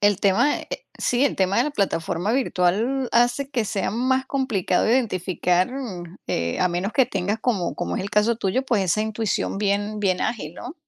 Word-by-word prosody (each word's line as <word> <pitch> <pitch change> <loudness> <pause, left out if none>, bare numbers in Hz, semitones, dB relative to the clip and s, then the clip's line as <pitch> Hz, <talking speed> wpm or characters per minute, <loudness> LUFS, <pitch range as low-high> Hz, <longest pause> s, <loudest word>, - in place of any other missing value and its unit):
El 205 -1 +3
tema, 205 +9 +3
eh - - -12 0.3
sí, 250 +2 +2
el 280 - +1
tema 190 +1 +1
de 240 - +4
la 300 - -1
plataforma 185 - -1
virtual 240 +2 +1
hace 245 +4 +2
que 245 -5 0
sea 200 -1 -1
más 260 +4 0
complicado 230 -10 0
identificar, 185 -5 +1
mm, 190 -10 -7
eh, 85 0 -1
a 180 - +3
menos 180 +5 -2
que 265 -3 +4
tengas, 200 +3 -2
como 200 -9 0
como 175 - -3
es - - -2
el 200 - -5
caso 210 +4 +2
tuyo, 220 +4 0
pues, 235 -6 +1
esa 185 +3 +1
intuición 220 -2 -1
bien 205 +1 0
bien 185 -3 +1
ágil, 170 -9 -3
¿no? 280 - -8
210 Hz, 195 wpm, -23 LUFS, 185-245 Hz, 0.3 s, de